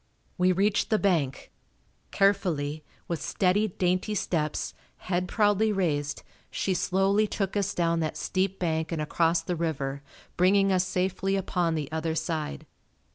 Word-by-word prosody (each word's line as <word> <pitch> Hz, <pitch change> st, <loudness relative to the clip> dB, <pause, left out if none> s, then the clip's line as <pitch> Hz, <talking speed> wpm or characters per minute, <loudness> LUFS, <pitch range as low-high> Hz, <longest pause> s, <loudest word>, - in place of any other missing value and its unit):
We 180 Hz, +1 st, +3 dB
reached 200 Hz, +3 st, +1 dB
the 220 Hz, -, +3 dB
bank. 165 Hz, -10 st, 0 dB, 0.6 s
Carefully, 165 Hz, -7 st, +1 dB, 0.2 s
with 170 Hz, -3 st, -3 dB
steady, 200 Hz, +3 st, +1 dB
dainty 185 Hz, +2 st, 0 dB
steps, 155 Hz, -6 st, -1 dB, 0.2 s
head 180 Hz, 0 st, -2 dB
proudly 210 Hz, +2 st, +2 dB
raised, 150 Hz, -7 st, -1 dB, 0.3 s
she 190 Hz, -, -1 dB
slowly 195 Hz, +4 st, +2 dB
took 195 Hz, -1 st, -2 dB
us 205 Hz, 0 st, 0 dB
down 170 Hz, -1 st, +1 dB
that 155 Hz, -1 st, -2 dB
steep 190 Hz, +1 st, -1 dB
bank 160 Hz, -2 st, -1 dB
and 165 Hz, -, -2 dB
across 165 Hz, +2 st, +1 dB
the 175 Hz, +1 st, -2 dB
river 140 Hz, -4 st, -2 dB, 0.4 s
bringing 195 Hz, +2 st, +4 dB
us 185 Hz, -1 st, +2 dB
safely 190 Hz, +1 st, 0 dB
upon 180 Hz, -3 st, 0 dB
the 150 Hz, -3 st, -2 dB
other 160 Hz, 0 st, -2 dB
side. 155 Hz, -, -3 dB
180 Hz, 140 wpm, -27 LUFS, 160-195 Hz, 0.6 s, bringing